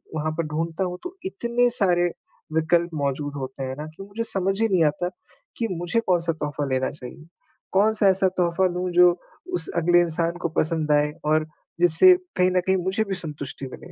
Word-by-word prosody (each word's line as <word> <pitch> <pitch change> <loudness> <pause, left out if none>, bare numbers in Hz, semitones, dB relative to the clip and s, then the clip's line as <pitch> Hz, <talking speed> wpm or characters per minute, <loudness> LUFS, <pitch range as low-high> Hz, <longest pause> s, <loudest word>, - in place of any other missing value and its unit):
वहाँ 155 0 -1
पर 165 - 0
ढूँढता 165 +4 -2
हूँ 180 -1 -3
तो 360 +1 -7
इतने 245 -8 +1
सारे 175 -3 +2 0.4
विकल्प 170 +2 +2
मौजूद 145 0 -2
होते 135 0 -6
हैं 130 0 -4
ना 150 - -5
कि 195 - -9
मुझे 205 +3 -5
समझ 195 -2 -1
ही 225 - +4
नहीं 185 -4 +3
आता 150 +4 0 0.5
कि 230 - -1
मुझे 175 +6 -1
कौन-सा 170 -2 +2
तोहफ़ा 150 -2 -3
लेना 130 0 0
चाहिए? 145 +3 -11 0.5
कौन-सा 210 +1 +3
ऐसा 190 0 +4
तोहफ़ा 175 +1 +2
लूँ 180 +1 -2
जो 180 0 +7 0.4
उस 170 -3 +1
अगले 175 +1 +4
इंसान 170 0 0
को 170 - 0
पसंद 155 -1 0
आए? 150 0 +3
और 155 +1 +2 0.3
जिससे 175 - +7 0.2
कहीं 180 0 +3
न 185 - +2
कहीं 190 +1 +1
मुझे 190 +4 0
भी 195 - -3
संतुष्टि 145 -5 -6
मिले - - -11
175 Hz, 190 wpm, -24 LUFS, 155-190 Hz, 0.5 s, जो